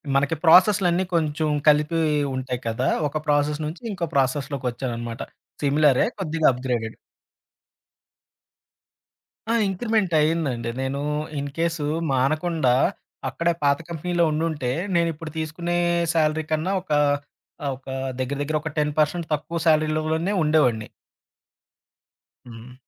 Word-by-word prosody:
మనకి 145 Hz, +3 st, +2 dB
ప్రాసెస్ 185 Hz, +5 st, +7 dB
లన్నీ 175 Hz, +2 st, +2 dB
కొంచెం 155 Hz, -1 st, 0 dB, 0.2 s
కలిపి 150 Hz, +2 st, +4 dB, 0.4 s
ఉంటాయి 130 Hz, -1 st, -3 dB
కదా, 115 Hz, +4 st, 0 dB, 0.2 s
ఒక 155 Hz, +2 st, -3 dB
ప్రాసెస్ 150 Hz, +1 st, +1 dB
నుంచి, 160 Hz, +9 st, -6 dB
ఇంకో 175 Hz, -4 st, -3 dB
ప్రాసెస్‌లోకొచ్చానన్నమాట. 125 Hz, -3 st, -2 dB, 0.4 s
సిమిలరే. 145 Hz, 0 st, +4 dB
కొద్దిగా 160 Hz, -3 st, +1 dB
అప్‌ 125 Hz, -, -8 dB
గ్రేడెడ్. 115 Hz, -3 st, -2 dB, 2.6 s
ఆ! -, -, +2 dB
ఇంక్రిమెంట్ 200 Hz, -1 st, 0 dB
అయిందండి. 150 Hz, -7 st, 0 dB
నేను 135 Hz, +1 st, -2 dB, 0.4 s
ఇన్‌కేసు 155 Hz, +2 st, -2 dB, 0.3 s
మానకుండా 155 Hz, +1 st, +1 dB, 0.6 s
అక్కడే 170 Hz, +6 st, 0 dB
పాత 140 Hz, 0 st, +4 dB
కంపెనీలో 170 Hz, +1 st, -1 dB
ఉండుంటే, 150 Hz, -4 st, -1 dB, 0.3 s
నేనిప్పుడు 165 Hz, -2 st, -1 dB
తీసుకునే 165 Hz, +2 st, -2 dB, 0.4 s
సాలరీ 160 Hz, -1 st, +2 dB
కన్నా 155 Hz, +5 st, 0 dB
ఒక, 180 Hz, -, -12 dB, 0.7 s
ఆహ్, 140 Hz, -2 st, -1 dB
ఒక 135 Hz, -, -25 dB, 0.3 s
దెగ్గర, 135 Hz, +2 st, -2 dB
దెగ్గర 155 Hz, +2 st, -1 dB
ఒక 155 Hz, -1 st, -5 dB
10% 150 Hz, +3 st, 0 dB
తక్కువ 165 Hz, +3 st, -2 dB
సాలరీ 155 Hz, -1 st, +4 dB
లోనే 160 Hz, +5 st, -1 dB
ఉండేవాడిని. 130 Hz, -8 st, +2 dB, 1.6 s
హ్మ్. 115 Hz, +2 st, -11 dB
150 Hz, 110 wpm, -24 LUFS, 135-165 Hz, 2.6 s, ప్రాసెస్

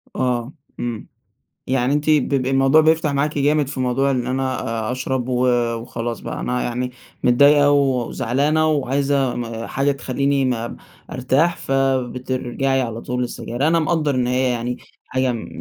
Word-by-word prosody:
آه، 125 Hz, +1 st, -1 dB, 0.3 s
امم، 120 Hz, -3 st, -4 dB, 0.6 s
يعني 130 Hz, +1 st, +1 dB
أنتِ 150 Hz, +1 st, 0 dB
ب 150 Hz, -3 st, +4 dB
ب 135 Hz, -3 st, 0 dB
الموضوع 135 Hz, +3 st, +4 dB
بيفتح 160 Hz, -1 st, +2 dB
معاكِ 145 Hz, +2 st, 0 dB
جامد 145 Hz, 0 st, +2 dB
في 140 Hz, -2 st, -6 dB
موضوع 130 Hz, +2 st, +1 dB
إن 125 Hz, -2 st, -1 dB
أنا 130 Hz, 0 st, -1 dB, 0.3 s
أ -, -, 0 dB
اشرب 130 Hz, 0 st, -2 dB
و 125 Hz, 0 st, +1 dB, 0.3 s
وخلاص 115 Hz, 0 st, -5 dB
بقى -, -, -6 dB
أنا 125 Hz, 0 st, -1 dB
يعني 125 Hz, +1 st, -2 dB, 0.3 s
متضايقة 145 Hz, +3 st, +5 dB
وزعلانة 140 Hz, +3 st, +1 dB
وعايزة 135 Hz, -5 st, 0 dB
حاجة 140 Hz, +1 st, +1 dB
م 140 Hz, -, -4 dB
تخليني 140 Hz, +1 st, 0 dB
ما 120 Hz, -2 st, -2 dB, 0.3 s
ارتاح، 135 Hz, +7 st, +1 dB
فبترجعي 130 Hz, 0 st, -1 dB
على 115 Hz, -1 st, -4 dB
طول 125 Hz, 0 st, -3 dB
للسجاير، 120 Hz, +3 st, -2 dB
أنا 165 Hz, 0 st, +3 dB
مقدَّر 155 Hz, -4 st, 0 dB
إن 125 Hz, -1 st, +1 dB
هي 125 Hz, 0 st, +1 dB
يعني 120 Hz, +1 st, -3 dB, 0.3 s
حاجة 130 Hz, -1 st, 0 dB
م 115 Hz, -, -5 dB
130 Hz, 155 wpm, -21 LUFS, 125-140 Hz, 0.6 s, متضايقة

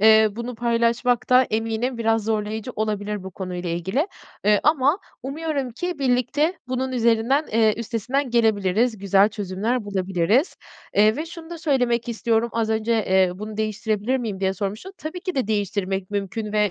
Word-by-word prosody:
eee, 220 Hz, 0 st, +7 dB
bunu 235 Hz, +3 st, -5 dB
paylaşmak 235 Hz, +1 st, +1 dB
da 255 Hz, +1 st, +7 dB
eminim 225 Hz, +3 st, -1 dB
biraz 225 Hz, -1 st, +1 dB
zorlayıcı 220 Hz, +2 st, -2 dB
olabilir 210 Hz, -1 st, -2 dB
bu 190 Hz, -, -7 dB
konuyla 180 Hz, -2 st, -5 dB
ilgili, 190 Hz, -, 0 dB, 0.4 s
ııı, 210 Hz, 0 st, +5 dB
ama 300 Hz, +2 st, +3 dB, 0.2 s
umuyorum 280 Hz, -1 st, -3 dB
ki 355 Hz, +8 st, -4 dB
birlikte 285 Hz, +6 st, +1 dB
bunun 260 Hz, +1 st, -2 dB
üzerinden 235 Hz, +5 st, +2 dB
eee, 220 Hz, -1 st, +4 dB
üstesinden 240 Hz, +4 st, -2 dB
gelebiliriz, 220 Hz, 0 st, +2 dB
güzel 200 Hz, +1 st, +4 dB
çözümler 210 Hz, +3 st, -2 dB
bulabiliriz. 195 Hz, -, +1 dB, 0.4 s
Eee, 215 Hz, +2 st, +5 dB
ve 310 Hz, +3 st, -3 dB
şunu 335 Hz, 0 st, -10 dB
da 340 Hz, -, -6 dB
söylemek 250 Hz, -6 st, +1 dB
istiyorum, 230 Hz, 0 st, +1 dB
az 225 Hz, -1 st, 0 dB
önce, 220 Hz, +1 st, 0 dB
eee, 190 Hz, -4 st, +3 dB
bunu 210 Hz, +2 st, -7 dB
değiştirebilir 215 Hz, +2 st, -1 dB
miyim 220 Hz, -7 st, -4 dB
diye 190 Hz, 0 st, +1 dB
sormuştun. 210 Hz, -, -4 dB
Tabii 330 Hz, +4 st, -6 dB
ki 370 Hz, -1 st, -4 dB
de 260 Hz, -5 st, 0 dB
değiştirmek 195 Hz, -2 st, -1 dB
mümkün 205 Hz, +1 st, -3 dB
ve 210 Hz, -2 st, +2 dB
225 Hz, 160 wpm, -23 LUFS, 205-255 Hz, 0.4 s, eee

